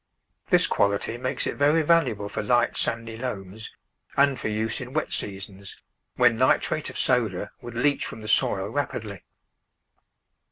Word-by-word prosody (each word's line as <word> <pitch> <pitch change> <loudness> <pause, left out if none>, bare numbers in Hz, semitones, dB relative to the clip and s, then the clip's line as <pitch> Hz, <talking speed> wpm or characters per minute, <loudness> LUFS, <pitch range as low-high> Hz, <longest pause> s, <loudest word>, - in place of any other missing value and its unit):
This - - +5
quality 100 +3 0
makes 130 +1 -2
it - - -1
very 150 +3 +3
valuable 150 -11 +2
for 100 - -4
light, 120 +3 +2
sandy 115 -1 -1
loams 105 -4 -6 0.5
and 140 -2 +3
for - - -3
use 110 +3 -2
in 125 +1 -8
wet 155 - -1
seasons, 100 -1 -4 0.4
when 120 -2 +4
nitrate 130 +4 +2
of - - -8
soda 110 -6 0
would 120 -1 -9
leach 140 +4 +1
from 110 - -8
the 110 - -8
soil 100 -2 +2
rapidly. 110 -7 -4
115 Hz, 150 wpm, -25 LUFS, 100-130 Hz, 0.5 s, This